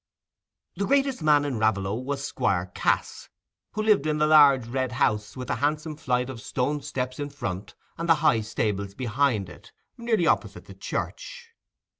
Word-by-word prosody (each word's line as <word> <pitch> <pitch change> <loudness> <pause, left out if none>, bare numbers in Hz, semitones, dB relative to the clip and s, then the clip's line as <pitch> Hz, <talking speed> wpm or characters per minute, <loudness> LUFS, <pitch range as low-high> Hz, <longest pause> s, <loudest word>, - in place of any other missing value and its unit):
The 200 - -1
greatest 275 -5 +1
man 150 -2 +4
in 130 -6 -2
Raveloe 100 -3 +1
was 135 +4 -3
Squire 90 -7 -1
Cass, - - -1 0.4
who 215 - -2
lived 210 -9 +3
in 150 0 0
the 150 - +3
large 145 -5 +6
red 130 +1 -2
house 105 -1 0
with 125 -1 -6
the - - -1
handsome 155 +2 -1
flight 125 -5 -1
of 130 -4 -8
stone 140 +6 -2
steps 130 0 -4
in 145 0 -3
front 100 -9 -6 0.2
and 170 0 -3
the 165 - +7
high 120 -7 +4
stables 105 -2 -2
behind 125 -4 0
it, 90 - -14 0.3
nearly 225 -6 +1
opposite - - 0
the - - -11
church. 485 -2 -6
135 Hz, 170 wpm, -26 LUFS, 110-155 Hz, 0.4 s, the